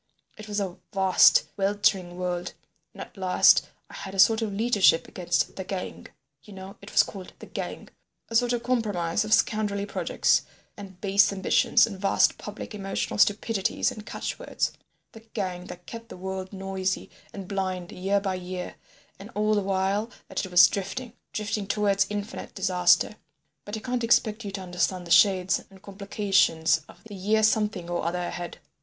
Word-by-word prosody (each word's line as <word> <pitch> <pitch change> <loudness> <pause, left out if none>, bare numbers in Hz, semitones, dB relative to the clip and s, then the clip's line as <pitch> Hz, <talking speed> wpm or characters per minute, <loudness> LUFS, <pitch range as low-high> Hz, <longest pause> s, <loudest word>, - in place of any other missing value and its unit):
It 215 0 -11
was 210 0 -2
a 190 -3 -3 0.2
vast 190 -2 +5
weltering 195 -3 +1
world, 180 -1 -3 0.4
and - - -8
at - - -17
last 185 -1 +4 0.2
I - - -16
had 195 0 -7
a - - -4
sort 220 +3 +6
of 220 -2 -2
leadership 205 -5 +3
against 180 -2 -1
the 190 - -3
Gang—you 145 -4 -9
know 190 0 -9
it 200 - -11
was - - +5
called 190 -3 -9
the - - -11
Gang—a 230 - -9
sort 245 +1 +3
of 240 -1 -1
compromise 210 -7 0
of 215 - -6
scoundrelly 205 -2 +2
projects 205 - +1 0.3
and 190 -3 -11
base 200 0 +4
ambitions 200 +4 +3
and 200 -4 -8
vast 195 -1 +3
public 210 +1 -8
emotional 195 0 -3
stupidities 205 +3 +2
and 215 -4 -9
catch - - -5
words—the 225 - -5 0.2
Gang 185 -4 -3
that 175 0 -10
kept 230 +3 -9
the - - -9
world 190 0 -5
noisy 190 -1 -3 0.2
and 195 -2 -8
blind 185 -3 -3
year 195 +2 0
by 195 -1 -2
year, 180 0 -6 0.4
and 200 +3 -10
all 215 +1 +2
the 205 - +2
while 195 +3 0 0.2
that - - -2
it 190 - -5
was 180 0 +8
drifting, 210 +5 -5 0.2
drifting 210 -1 -3
towards 200 -1 +2
infinite 205 +1 -6
disaster. 185 +1 +3 0.5
But 205 +2 -5
I - - -5
can't 250 0 -2
expect 225 -1 +2
you 205 - -5
to 195 - -4
understand 180 0 -1
the 170 - -8
shades 185 +2 +4
and 195 0 -16
complications 195 -5 +1
of - - -16
the 225 -2 -11
year—the 195 +1 -7
year 220 - +2
something 210 -4 +1
or 175 0 -2
other 170 +2 -1
ahead. 175 0 -5
195 Hz, 175 wpm, -26 LUFS, 185-210 Hz, 0.5 s, was